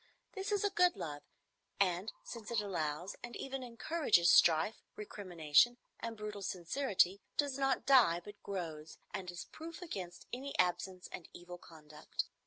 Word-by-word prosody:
This 390 Hz, +1 st, -4 dB
is 410 Hz, -1 st, +2 dB
a 410 Hz, -, +2 dB
good 360 Hz, -1 st, +4 dB
love, 145 Hz, -2 st, -5 dB, 0.6 s
and, 185 Hz, +1 st, +2 dB
since 230 Hz, -3 st, -8 dB
it 235 Hz, -2 st, +1 dB
allows, 175 Hz, -3 st, -2 dB
and 240 Hz, -1 st, -7 dB
even 270 Hz, 0 st, -4 dB
encourages, 235 Hz, -, +3 dB
strife, 165 Hz, +6 st, +5 dB
recrimination, 185 Hz, 0 st, +2 dB, 0.2 s
and 230 Hz, -1 st, -5 dB
brutal 210 Hz, -1 st, -5 dB
sincerity, 190 Hz, +1 st, +1 dB, 0.2 s
does 280 Hz, -2 st, +1 dB
not 270 Hz, -3 st, +1 dB
die, 240 Hz, -11 st, +6 dB
but 205 Hz, +4 st, -12 dB
grows, 160 Hz, -5 st, -5 dB, 0.2 s
and 190 Hz, -3 st, -4 dB
is 175 Hz, -1 st, -6 dB
proof 325 Hz, +1 st, -9 dB
against 185 Hz, -, -6 dB
any 275 Hz, +3 st, -4 dB
absence 180 Hz, +1 st, 0 dB
and 170 Hz, -, -8 dB
evil 175 Hz, 0 st, -9 dB
conduct. 155 Hz, -3 st, -6 dB
200 Hz, 150 wpm, -35 LUFS, 175-255 Hz, 0.6 s, die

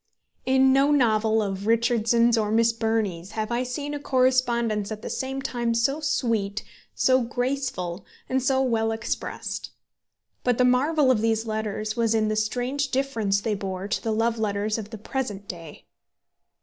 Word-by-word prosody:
In 265 Hz, 0 st, +5 dB
no 275 Hz, +1 st, +4 dB
novel 220 Hz, -5 st, +3 dB
of 195 Hz, 0 st, -4 dB
Richardson's 235 Hz, 0 st, +3 dB
or 215 Hz, -2 st, 0 dB
Miss 230 Hz, +1 st, +3 dB
Burney's 220 Hz, -5 st, -2 dB
have 215 Hz, +1 st, -3 dB
I 240 Hz, +1 st, +1 dB
seen 285 Hz, +4 st, -4 dB
a 290 Hz, -, -3 dB
correspondence 245 Hz, -6 st, +1 dB
at 215 Hz, 0 st, -6 dB
the -, -, -4 dB
same 270 Hz, 0 st, -3 dB
time 235 Hz, -2 st, -1 dB
so 270 Hz, +6 st, +1 dB
sweet, 230 Hz, -9 st, -1 dB, 0.3 s
so 260 Hz, 0 st, +3 dB
graceful, 245 Hz, -7 st, -2 dB, 0.2 s
and 260 Hz, 0 st, 0 dB
so 265 Hz, +1 st, +2 dB
well 225 Hz, -3 st, +1 dB
expressed. 225 Hz, +1 st, -4 dB, 0.7 s
But 245 Hz, -2 st, +2 dB
the 250 Hz, -, +4 dB
marvel 270 Hz, +3 st, +3 dB
of 225 Hz, -4 st, +2 dB
these 225 Hz, 0 st, +1 dB
letters 215 Hz, -1 st, -3 dB
was 230 Hz, -1 st, +1 dB
in 215 Hz, -1 st, +2 dB
the 215 Hz, -, 0 dB
strange 245 Hz, +6 st, -1 dB
difference 230 Hz, -7 st, 0 dB
they 220 Hz, 0 st, -1 dB
bore 195 Hz, -1 st, -4 dB
to -, -, -1 dB
the 225 Hz, -, -2 dB
love 225 Hz, +1 st, 0 dB
letters 210 Hz, +1 st, -1 dB
of 210 Hz, -1 st, -7 dB
the 220 Hz, -, -7 dB
present 210 Hz, -3 st, -4 dB
day. 165 Hz, -4 st, -9 dB
230 Hz, 165 wpm, -25 LUFS, 215-255 Hz, 0.7 s, In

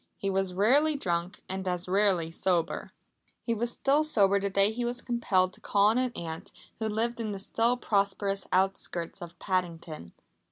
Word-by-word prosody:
He 195 Hz, -, -2 dB
was 190 Hz, -1 st, -1 dB
rarely 280 Hz, +10 st, +4 dB
drunk, 175 Hz, -6 st, -2 dB
and 190 Hz, 0 st, -4 dB
as 180 Hz, 0 st, -2 dB
rarely 185 Hz, -4 st, +2 dB
sober. 175 Hz, -1 st, 0 dB, 0.5 s
He 235 Hz, -, 0 dB
was 235 Hz, +2 st, -2 dB, 0.2 s
sober 200 Hz, -10 st, +3 dB
the 200 Hz, 0 st, -1 dB
day 195 Hz, +1 st, +3 dB
he 240 Hz, +2 st, -3 dB
was 240 Hz, +1 st, -1 dB
compelled 190 Hz, -7 st, +1 dB
to -, -, -13 dB
call 205 Hz, 0 st, +3 dB
on 230 Hz, +3 st, +2 dB
an 255 Hz, -1 st, 0 dB
aunt 160 Hz, -1 st, -6 dB, 0.3 s
who 220 Hz, -, -1 dB
lived 230 Hz, +3 st, -1 dB
in 215 Hz, -2 st, -2 dB
the -, -, -4 dB
still 230 Hz, +5 st, 0 dB
prosperous 200 Hz, -3 st, 0 dB
outskirts 185 Hz, -2 st, -1 dB
of 170 Hz, 0 st, -9 dB
Paddington. 170 Hz, -, -3 dB
195 Hz, 170 wpm, -29 LUFS, 180-225 Hz, 0.5 s, rarely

